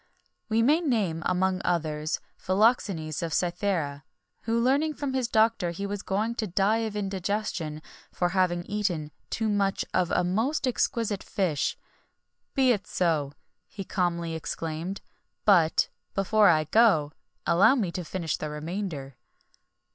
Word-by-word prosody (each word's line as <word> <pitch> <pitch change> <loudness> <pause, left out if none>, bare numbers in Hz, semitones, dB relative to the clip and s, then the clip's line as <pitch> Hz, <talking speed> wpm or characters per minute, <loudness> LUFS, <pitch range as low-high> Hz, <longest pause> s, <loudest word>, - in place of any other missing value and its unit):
We 225 +1 +3
may 295 +7 +4
name, 210 - 0
among 185 +1 +1
others, 155 -3 -1 0.2
Philoxenes 185 - +1
of 165 -3 -2
Cythera, 170 -6 -1 0.4
who 230 +1 +1
learning 280 +6 +2
from 280 -2 -3
his 260 -2 0
doctor 220 -4 +2
that 170 0 -5
he 200 - -3
was 200 0 -3
going 215 +4 -1
to 215 - -2
die 200 +5 +2
of 210 - -11
indigestion, 195 -5 -3 0.3
for 175 - 0
having 175 -2 +1
eaten 180 -8 -2 0.2
too 225 - -1
much 200 -2 +1
of 180 -2 +2
a - - +2
most 225 - 0
exquisite 230 -4 0
fish: 175 -7 -1 0.8
"Be 265 -3 +4
it 205 -4 -1
so," 155 -6 0 0.3
he 200 - -7
calmly 170 -3 -1
exclaimed; 160 +3 -4 0.4
"but, 175 -6 +4 0.3
before 205 +1 +4
I 155 -2 +4
go, 155 -4 +4 0.3
allow 170 - +5
me 205 -10 -1
to 180 - -4
finish 165 -1 -3
the 155 - -4
remainder." 150 -4 -5
190 Hz, 140 wpm, -27 LUFS, 165-215 Hz, 0.8 s, allow